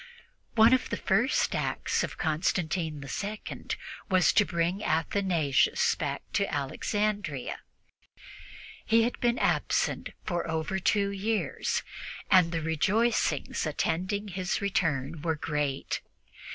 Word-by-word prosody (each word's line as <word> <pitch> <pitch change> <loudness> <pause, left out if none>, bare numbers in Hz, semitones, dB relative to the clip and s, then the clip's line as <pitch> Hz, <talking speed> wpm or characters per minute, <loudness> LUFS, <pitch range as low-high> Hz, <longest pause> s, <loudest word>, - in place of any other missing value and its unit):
One 225 +2 +7
of 260 - +2
the - - -2
first - - +2
acts - - 0
of - - -5
Constantine 155 -1 -1
II 205 +10 -5 0.4
was 185 -2 +4
to - - +6
bring 175 +3 -1
Athanasius 165 -3 +2
back 140 -2 -3
to 200 -1 +1
Alexandria. 170 - -2 1.2
He 225 +1 +4
had 240 - -1
been 240 0 +2
absent - - +1
for 175 -1 -2
over 160 +4 -1
two 200 +1 +2
years, 210 +2 -1 0.5
and 180 -3 +6
the 165 -2 -2
rejoicings 180 - +1
attending 185 +7 -1
his 185 0 -2
return 165 -7 -1
were 160 0 0
great. 150 -3 -2
180 Hz, 110 wpm, -29 LUFS, 155-205 Hz, 1.2 s, One